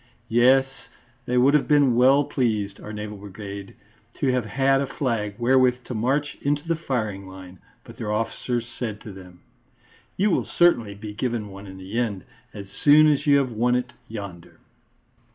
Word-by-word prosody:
Yes, 130 +3 +5 0.6
they 125 - 0
would 130 +3 +5
have 150 - +3
been 145 -5 +4
well 135 +4 +5
pleased, 110 -8 -1
our 105 - -8
Naval 105 0 -6
Brigade, 100 0 -9 0.4
to 135 - 0
have 125 -3 0
had 135 +4 +2
a 140 - -2
flag 115 -9 -2
wherewith 125 +1 +3
to - - -7
march 135 +6 -1
into 145 +2 -1
the 165 - +1
firing 110 - -3
line, 95 -1 -12 0.2
but 115 - -14
their 110 -4 -4
officers 115 +2 -2
said 110 -4 -4
to 105 - -9
them: 90 -2 -14 0.8
"You 205 +2 +2
will - - +1
certainly 120 -13 +2
be 105 +1 -8
given 115 -1 -3
one 100 +1 -10
in 95 0 -10
the 95 +5 -4
end, 105 -7 -2 0.3
as 100 -1 -8 0.2
soon 150 +1 +7
as 150 -1 +2
you 140 -1 +6
have 135 -3 0
won 120 +2 +1
it 125 -1 -2
yonder." 100 -6 -9
120 Hz, 175 wpm, -24 LUFS, 105-135 Hz, 0.8 s, soon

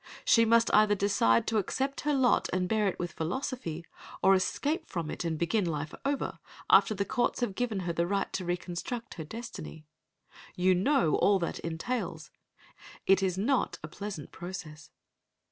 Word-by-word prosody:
She 230 -1 +5
must 230 0 +4
either 210 -1 +5
decide 190 - +3
to 225 -1 +1
accept 270 +7 -2
her 295 0 +1
lot 260 -3 +3
and 185 0 0
bear 215 +1 +2
it 190 - -1
with 175 0 -3
philosophy, 175 - -4 0.4
or 195 - +7
escape 290 - 0
from 165 -3 -3
it - - -4
and 165 -2 -1
begin 175 +6 +1
life 155 -3 -3
over, 280 0 -2 0.3
after 215 - +6
the 200 0 -1
courts 245 +4 0
have 240 -5 0
given 220 -3 -2
her 175 -1 -2
the 170 +1 0
right 195 +1 -1
to 190 - -2
reconstruct 175 +6 -4
her 160 - -6
destiny. 160 -5 -8 0.7
You 185 +1 +3
know 195 - +2
all 200 -1 +4
that 170 -2 -3
entails. 165 -1 -4 0.7
It 195 0 +5
is 185 -1 0
not 250 +7 +1
a - - -4
pleasant 190 -1 -7
process. 165 -5 -8
190 Hz, 170 wpm, -30 LUFS, 170-230 Hz, 0.7 s, or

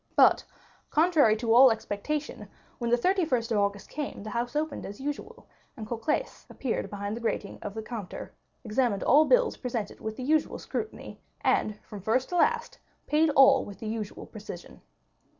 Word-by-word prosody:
But, - - +6 0.5
contrary 310 -8 +4
to 225 0 +1
all 260 +2 +9
expectation, 230 +7 -3 0.3
when 235 -1 -1
the 240 - +4
31st 265 -7 +1
of 215 - +2
August 200 0 -1
came, 290 -8 -5
the 215 - -6
house 240 +3 -2
opened 305 -1 -2
as 205 - -8
usual, 295 - -6 0.3
and 220 - -6
Cocles 235 - -3
appeared 255 -4 -3
behind 205 +1 -4
the 235 - -7
grating 215 -3 -3
of 205 0 -6
the 220 - -4
counter, 215 -5 -7 0.3
examined 220 -3 0
all 300 +4 +6
bills - - +3
presented 235 -5 -4
with 220 0 -5
the 255 - -5
usual 305 +3 +1
scrutiny, 435 - -6 0.2
and, 210 -1 +1
from 205 -2 -9
first 230 +6 +1
to 355 - -3
last, 465 +5 +1 0.3
paid 310 +1 +3
all 270 0 +7
with 200 -2 -9
the 220 - -7
usual 215 -2 -5
precision. 205 -5 -10
240 Hz, 170 wpm, -28 LUFS, 215-300 Hz, 0.5 s, all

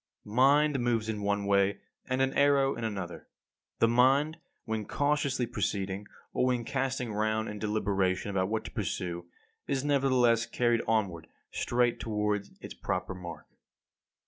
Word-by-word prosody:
60. 105 - -9
Mind 140 +2 +4
moves 115 -2 0
in 105 -2 -2
one 100 0 0
way, 100 0 +3 0.3
and 130 +1 +2
an 135 - 0
arrow 140 -1 +4
in 120 - -6
another. 95 -7 -5 0.5
The 115 - +4
mind, 135 +6 +3 0.3
when 110 -2 -2
cautiously 145 -3 +1
proceeding, 100 -2 -2 0.3
or 125 - +2
when 125 -2 0
casting 135 -4 -2
round 110 +1 0
in 105 0 -6
deliberation 100 -2 0
about 95 -1 0
what 110 0 -2
to - - -7
pursue, 85 -1 -3 0.4
is 135 -1 0
nevertheless 130 -5 +3
carried 120 -1 +1
onward 100 -8 0 0.2
straight 120 -1 +1
toward 105 -2 -1
its - - -8
proper - - -3
mark. 85 -4 -8
110 Hz, 145 wpm, -30 LUFS, 100-130 Hz, 0.5 s, Mind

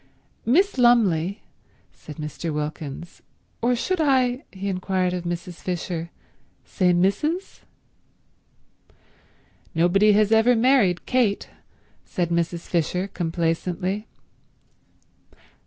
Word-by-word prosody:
"Miss 345 - +3
Lumley," 200 -6 +3 0.5
said 150 - -11
Mr. 155 +2 -5
Wilkins, 150 +1 -6 0.4
"—or 245 +1 +2
should 350 +8 -1
I," 260 -3 +2
he 195 +1 -6
inquired 185 -1 -1
of 180 -1 -4
Mrs. 175 0 -5
Fisher, 175 -2 -4 0.6
"say 180 -3 +1
Mrs.?" 200 - 0 2.2
"Nobody 195 +6 +4
has 210 +1 +3
ever 225 +2 +5
married 225 -7 +3
Kate," 240 -6 +1 0.5
said 175 -2 -2
Mrs. 170 0 -1
Fisher 180 +3 -1
complacently. 175 +4 -2
185 Hz, 90 wpm, -23 LUFS, 170-230 Hz, 2.2 s, ever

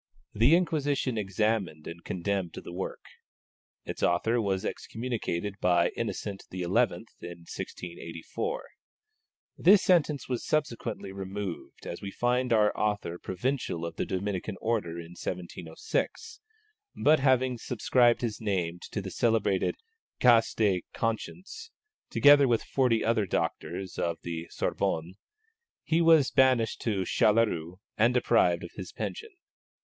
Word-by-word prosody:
The 120 +10 +5
Inquisition 145 -7 0
examined 100 -5 -1
and 85 +1 -8
condemned 95 -1 -2
the 85 - -8
work. 95 +2 -5 0.8
Its - - -6
author 115 +7 +2
was 95 -3 -1
excommunicated 110 -5 -3
by 90 -1 +3
Innocent 100 -1 -4
XI. 90 0 -4
in 85 - -3
1684. 90 - -3 1.0
This 200 +2 +6
sentence 155 -5 +2
was 125 -2 -2
subsequently 120 -9 -2
removed, 95 -1 -6
as 85 - -6
we 100 - -5
find 125 +3 0
our 105 -2 +4
author 105 -5 -1
Provincial 95 -4 -2
of 85 -1 -6
the - - -2
Dominican 95 +1 -3
Order 110 -7 -1
in 85 0 -8
1706; 90 - -4 0.6
but 155 +2 +5
having 130 -2 +2
subscribed 120 0 +2
his 115 -3 -3
name 90 -5 -1
to 105 - -3
the 95 - -6
celebrated 110 -4 +1 0.4
Cas 120 -2 +5
de 100 -5 +2
Conscience, 185 - -4 0.4
together 145 -1 +6
with 115 -2 +2
forty 125 -4 +1
other 110 -3 +2
doctors 95 +1 -3
of 85 -1 -1
the 85 0 -5
Sorbonne, 80 +3 -1 0.7
he 165 +1 +2
was 165 -4 +5
banished 130 -4 +3
to 105 -5 0
Châtelleraut 95 -4 +2 0.2
and 120 +3 +4
deprived 90 -8 +3
of - - -8
his - - -7
pension. 445 - -5
105 Hz, 125 wpm, -29 LUFS, 90-125 Hz, 1.0 s, This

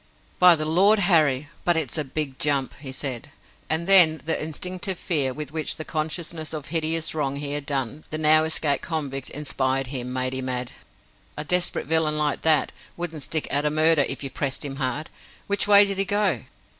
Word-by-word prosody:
"By 180 -1 +8
the 155 -1 -4
Lord 190 +7 +4
Harry, 155 -8 +2 0.2
but 175 -1 +2
it's 150 -6 -1
a 155 - 0
big 135 -1 -5
jump!" 140 -3 0
he 135 -2 -7
said; 130 -3 -5 0.4
and 160 +2 0
then 175 -5 +7
the 160 - -1
instinctive 180 +4 -3
fear 145 -7 0
with 150 +1 -7
which 155 -1 -2
the 155 - -7
consciousness 160 0 -4
of 155 -2 -5
the - - -10
hideous 160 0 0
wrong 140 -3 -2
he 140 0 -4
had 145 -1 -4
done 140 +1 -3
the 155 - -3
now 155 0 +5
escaped 155 -3 0
convict 140 -5 -4
inspired 135 -2 -1
him, 125 -1 -4
made 130 0 -2
him 130 0 -4
add: 125 -1 -3 0.7
"A 150 - -2
desperate 180 +3 +1
villain 160 -1 +1
like 150 -1 -1
that 155 -2 +3 0.3
wouldn't 165 -3 -4
stick 155 +2 0
at 145 +1 +1
a 150 - +1
murder 155 0 +4
if - - -4
you 135 - -4
pressed 140 +1 -3
him 135 -1 -6
hard. 140 +3 -3 0.3
Which 200 0 +1
way 205 0 +8
did 195 -1 -3
he 195 - +1
go?" 205 +1 0
155 Hz, 200 wpm, -24 LUFS, 140-165 Hz, 0.7 s, By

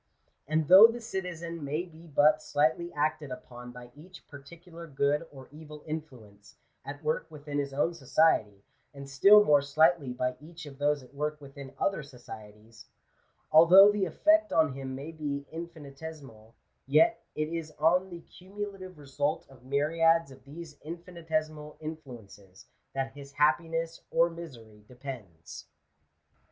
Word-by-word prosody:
And 155 0 0
though 190 +6 +10
the 230 +1 -5
citizen 170 -6 -6
may 150 +4 -2
be 170 -1 -16
but 150 +1 +3
slightly 160 +4 0
acted 150 -1 -2
upon 125 -1 -10
by 120 0 -12
each 170 +4 -15
particular 170 +4 -12
good 145 +2 0
or 135 -2 -13
evil 150 0 -12
influence, 120 -10 -9 0.3
at 145 +3 -9
work 155 +1 -1
within 145 -2 -5
his 140 -1 -3
own 145 +5 0
society, 130 -9 +1 0.3
and 140 0 -9
still 200 +10 +6
more 145 -4 +5
slightly 155 0 +2
by 125 0 -2
each 165 +2 -12
of 140 -2 -12
those 145 -1 +1
at 125 +1 -19
work 150 +1 -3
within 140 -1 -11
other 195 -5 -1
societies 110 -4 -13 0.3
— - - -42
although 180 +6 +8
the 205 -2 0
effect 315 - +2
on 155 -4 +2
him 130 -1 -6
may 140 +4 -7
be 145 -3 -5
infinitesimal, 145 -8 -10 0.3
yet 190 +12 +3
it 155 0 -2
is 165 -2 -5
on 180 +5 +2
the 170 -2 -9
cumulative 190 0 -9
result 145 +1 -3
of 130 -3 -18
myriads 165 +3 +2
of 130 -1 -15
these 150 +1 -11
infinitesimal 155 -2 -5
influences 120 - -11 0.3
that 135 0 -2
his 140 0 -12
happiness 165 +3 0
or 170 +1 +2
misery 115 -11 -12
depends. 120 - -10
150 Hz, 145 wpm, -29 LUFS, 135-165 Hz, 0.3 s, though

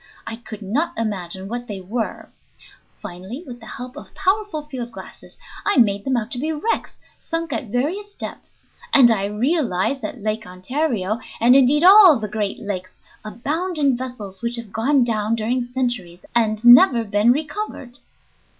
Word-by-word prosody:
I 225 - -5
could 220 -3 -9
not 300 - -1
imagine 190 -4 -4
what 240 +3 -5
they 205 -2 -5
were. 215 +5 -4 0.7
Finally, 190 - -7
with 245 -1 -9
the 225 - -13
help 250 +2 -8
of 295 - -12
powerful 390 -4 0
field 255 -5 -6
glasses, - - -12 0.3
I 410 - +1
made 200 -4 +3
them 265 -2 +1
out 230 0 -3
to 245 - -2
be 310 +4 -1
wrecks 320 +9 -2 0.2
sunk 330 0 -3
at 250 - -3
various 345 - -3
depths, - - -8 0.4
and 245 -4 +8
I 200 -3 +1
realized 245 - 0
that 210 - -5
Lake 215 0 -3
Ontario, 215 +2 -2 0.2
and 245 +3 +5
indeed 275 +3 +5
all 375 -4 +9
the 215 -1 -4
great 210 -1 -3
lakes, 190 -4 -6 0.2
abound 310 - -3
in 280 -4 +3
vessels 240 -6 -7
which 235 0 -1
have 230 -4 -7
gone 260 +4 +2
down 220 -1 0
during 240 +3 -1
centuries 240 -8 -3
and 220 -1 +1
never 240 0 +8
been 205 +2 +3
recovered. 290 - -4
240 Hz, 165 wpm, -21 LUFS, 215-285 Hz, 0.7 s, all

